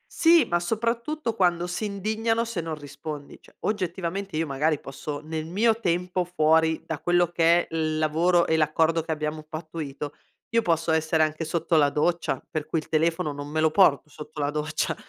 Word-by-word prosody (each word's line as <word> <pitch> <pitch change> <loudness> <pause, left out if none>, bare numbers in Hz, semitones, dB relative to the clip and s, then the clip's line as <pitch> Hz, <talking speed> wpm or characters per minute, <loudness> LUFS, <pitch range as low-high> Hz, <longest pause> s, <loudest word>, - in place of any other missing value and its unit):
Sì, 335 -4 +6
ma 175 -5 +1
soprattutto 230 - -2
quando 175 -3 +2
si 180 +5 -3
indignano 220 +3 -1
se 225 -6 -3
non 165 -1 -4
rispondi. 145 0 -8
Cioè - - -21
oggettivamente 190 -2 -2
io 165 - +1
magari 150 +1 0
posso, 145 +2 -6
nel 155 0 -4
mio 220 +6 +2
tempo 180 -1 0
fuori 160 -2 +2
da 160 -3 -4
quello 175 0 +2
che 170 0 +3
è - - -7
il 155 -1 0
lavoro 170 +3 +3
e 160 - +1
l'accordo 160 +1 +2
che 160 - -5
abbiamo 155 0 -3
pattuito, 155 -2 -6 0.4
io 230 0 +2
posso 165 -3 +1
essere 160 0 +2
anche 155 +1 -2
sotto 165 +1 0
la 145 -2 +5
doccia, 170 +4 0
per 155 -1 -4
cui 160 - -1
il 155 - -4
telefono 160 -1 +1
non 145 0 -7
me 155 +2 -2
lo 160 0 +3
porto 155 -5 +4
sotto 150 0 -10
la 145 0 0
doccia 150 0 -1
165 Hz, 185 wpm, -25 LUFS, 155-180 Hz, 0.4 s, Sì